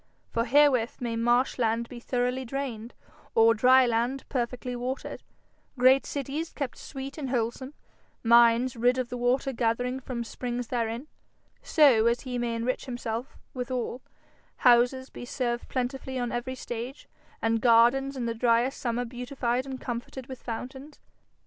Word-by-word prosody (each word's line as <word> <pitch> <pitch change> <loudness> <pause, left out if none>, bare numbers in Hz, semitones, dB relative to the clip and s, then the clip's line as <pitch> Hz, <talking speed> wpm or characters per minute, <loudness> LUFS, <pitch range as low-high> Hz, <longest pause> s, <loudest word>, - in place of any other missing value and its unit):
For 230 0 0
herewith 260 -4 +3
may 235 -2 -2
marsh 240 +3 +2
land 230 0 +1
be 240 - -9
thoroughly 250 +1 -1
drained, 245 -3 -5 0.4
or 225 0 +6
dry 255 +4 +6
land 240 +3 -1
perfectly 250 -1 -3
watered; 250 +2 -4 0.6
great 260 +2 +5
cities 290 +4 -4
kept 280 -5 -5
sweet 275 +2 -7
and 275 -3 -3
wholesome; 250 +3 -2 0.5
mines 235 +1 +5
rid 245 +2 +2
of 255 -2 -2
the 250 - -4
water 255 +2 +1
gathering 245 +2 0
from 250 -2 -4
springs 245 0 -5
therein, 235 +1 -2 0.6
so 260 -8 +5
as 235 +1 +1
he 250 -2 -4
may 235 -1 -1
enrich 235 +3 -2
himself 240 -1 -5 0.2
withal; 250 0 -3 0.6
houses 250 +2 +4
be - - -9
served 240 -1 -3
plentifully 260 +1 -3
on 245 -1 -2
every 240 +2 -3
stage; 245 +2 -6 0.3
and 225 0 +1
gardens 250 +4 +4
in 245 - -2
the 230 - -1
dryest 235 +3 +2
summer 240 0 -1
beautified 245 +1 -2
and 260 -1 -5
comforted 245 +2 -5
with 260 -1 -9
fountains. 265 +5 -7
245 Hz, 150 wpm, -27 LUFS, 235-260 Hz, 0.6 s, or